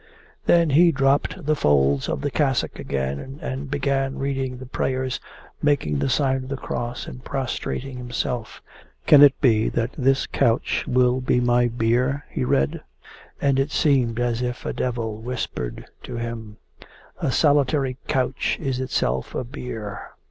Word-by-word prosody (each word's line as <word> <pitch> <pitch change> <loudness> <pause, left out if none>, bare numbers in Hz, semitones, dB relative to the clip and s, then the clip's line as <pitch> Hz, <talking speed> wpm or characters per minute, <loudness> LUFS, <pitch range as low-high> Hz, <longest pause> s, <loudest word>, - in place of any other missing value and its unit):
Then 170 -3 +5
he 170 +4 +6
dropped 140 +4 +1
the 155 +1 +2
folds 70 - +2
of - - -2
the 145 0 -2
cassock 135 -4 0
again 70 - -3
and 135 -3 -5
began 135 -1 0
reading 135 -2 -2
the 130 - -9
prayers, 130 +1 -2 0.4
making 130 - +1
the - - 0
sign 135 -1 +2
of 130 0 -7
the 140 - -3
cross 120 -1 -4
and 125 - -9
prostrating 135 -1 -3
himself. 125 -1 -4 0.4
'Can 145 - +8
it 145 -1 +7
be 110 -5 +4
that 120 +1 -1
this 135 0 +2
couch 120 -3 +1
will 125 0 +3
be 125 -1 +2
my 120 0 +3
bier?' 120 +4 0
he - - -2
read. 70 - +1 0.6
And 140 -1 +2
it 135 +2 +1
seemed 130 -7 +2
as 120 -1 0
if 125 0 -3
a - - -2
devil 115 -4 -2
whispered 110 - -4 0.2
to 125 - -7
him: 115 -2 -5 0.6
'A - - 0
solitary 140 -2 +2
couch 130 0 0
is 135 -4 -2
itself 65 - -1
a - - -1
bier. 115 -5 -7
130 Hz, 155 wpm, -23 LUFS, 120-135 Hz, 0.6 s, Can